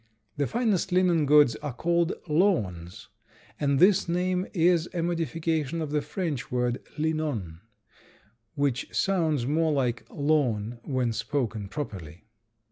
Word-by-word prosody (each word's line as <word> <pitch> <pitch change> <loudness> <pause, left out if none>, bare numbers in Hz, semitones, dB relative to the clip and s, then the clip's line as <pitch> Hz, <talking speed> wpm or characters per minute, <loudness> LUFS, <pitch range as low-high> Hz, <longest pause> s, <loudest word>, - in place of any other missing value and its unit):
The 145 -1 0
finest 220 -6 0
linen 175 -4 +3
goods 145 -5 +6
are 145 -2 -6
called 170 +3 +1
lawns, 105 - 0 0.5
and 140 -2 +1
this 190 +2 +4
name 180 +2 0
is 170 -2 +2
a 170 - 0
modification 165 -2 -1
of 155 -3 -3
the 150 0 +1
French 150 -3 -4
word 125 0 -1
linon, 150 - -2 1.0
which 140 -3 0
sounds 160 -9 +1
much 155 +3 +1
like 125 -3 -1
lawn 125 -7 0
when 125 -4 -1
spoken 110 -4 -2
properly. 95 - -7
150 Hz, 125 wpm, -27 LUFS, 120-170 Hz, 1.0 s, goods